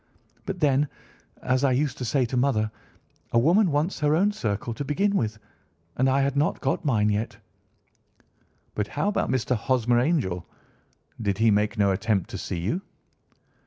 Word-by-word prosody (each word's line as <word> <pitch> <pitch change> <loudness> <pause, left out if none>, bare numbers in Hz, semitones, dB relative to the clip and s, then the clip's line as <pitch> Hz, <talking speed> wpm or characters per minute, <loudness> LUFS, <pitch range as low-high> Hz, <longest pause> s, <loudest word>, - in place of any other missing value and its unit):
But 195 -2 -3
then, 145 0 +3 0.6
as 130 +1 +1
I 135 -2 +3
used 140 +2 -1
to 125 - -3
say 130 +3 +1
to 120 - -4
mother, 120 -5 +1 0.6
a - - +4
woman 175 - +4
wants 150 +5 0
her 150 0 +2
own 200 +5 +3
circle 110 - -3
to 130 - -4
begin 195 +9 0
with, 110 - -1 0.6
and 130 +1 +2
I 135 +1 +3
had 140 0 0
not 145 +3 +1
got 135 -1 -1
mine 110 -7 +2
yet." 105 +2 -2 1.4
"But 105 -1 -2
how 150 - -1
about 210 - -1
Mr. 130 0 +1
Hosmer 120 +1 +1
Angel? 120 - 0 0.8
Did 100 -3 0
he 110 0 +4
make 105 +3 +1
no 100 -1 +3
attempt 100 -1 0
to - - -5
see 90 - -4
you?" 105 - -2
130 Hz, 170 wpm, -25 LUFS, 110-145 Hz, 1.4 s, a